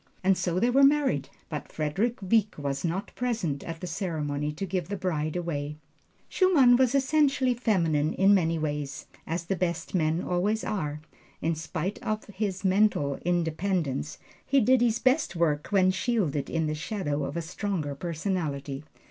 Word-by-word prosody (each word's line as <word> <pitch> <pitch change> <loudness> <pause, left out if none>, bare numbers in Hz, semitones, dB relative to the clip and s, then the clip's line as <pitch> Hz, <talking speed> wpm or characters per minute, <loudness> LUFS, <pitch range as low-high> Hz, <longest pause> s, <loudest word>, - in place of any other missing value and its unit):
And 190 +1 +4
so 180 -1 -1
they 240 +5 +3
were 270 +3 +4
married; 275 - +3 0.2
but 150 -3 -6
Frederick 195 - -1
Wieck 215 +2 +2
was 140 -2 -3
not 175 +4 -2
present 220 - -2
at 165 -1 -7
the - - -4
ceremony 150 -4 -2
to 160 +6 -4
give 185 -3 -2
the 200 - -2
bride 155 -4 -2
away. 150 -4 -3 0.5
Schumann 295 -11 +5
was 260 +1 +3
essentially 275 -2 +3
feminine 165 -11 +1
in 195 +2 +5
many 165 -4 +2
ways, 145 -3 -3 0.2
as 170 +1 -2
the 195 - -1
best 170 -1 -2
men 160 -1 +1
always 200 +5 0
are. 150 -7 -3 0.4
In 165 - 0
spite 160 +4 -4
of 215 0 -2
his 200 -2 -3
mental 190 -8 +2
independence, 165 -4 -1 0.3
he 275 +1 +3
did 255 +1 +4
his 235 -2 +3
best 260 - +2
work 155 -3 +1
when 185 -2 +4
shielded 185 - -1
in 165 -1 0
the 155 - -1
shadow 155 -3 -2
of 140 +4 -4
a - - 0
stronger 170 -3 -3
personality. 150 -4 -3
175 Hz, 165 wpm, -27 LUFS, 155-210 Hz, 0.5 s, Schumann